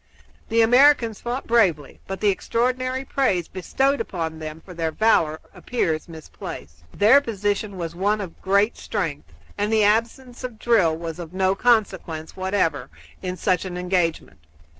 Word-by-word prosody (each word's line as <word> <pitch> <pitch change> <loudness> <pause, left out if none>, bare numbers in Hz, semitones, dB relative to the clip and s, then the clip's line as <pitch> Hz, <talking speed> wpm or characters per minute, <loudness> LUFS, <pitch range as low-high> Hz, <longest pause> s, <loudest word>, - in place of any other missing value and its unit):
The 230 0 +4
Americans 245 -2 +4
fought 245 +3 -3
bravely, 185 -12 +1
but 195 0 -5
the 210 - +4
extraordinary 255 +6 -1
praise 195 -12 0
bestowed 270 +10 0
upon 160 -3 -4
them 155 0 -7
for 185 - -10
their 165 -1 -1
valor 160 -7 +2
appears 165 -10 -2
misplaced. 80 - -9
Their 230 +8 +5
position 205 -4 -2
was 170 -2 -4
one 205 +4 +1
of 190 -5 -8
great 200 +3 +2
strength, - - -4 0.3
and 205 +1 0
the 220 -1 +3
absence 235 +4 0
of 245 -3 -6
drill 195 -9 +2
was 165 0 -6
of 170 0 -8
no 190 0 +2
consequence 195 -8 0
whatever 185 -8 -1 0.3
in 185 0 -4
such 180 +1 +1
an 180 -2 -5
engagement. 180 - -1
195 Hz, 150 wpm, -23 LUFS, 165-230 Hz, 0.3 s, Their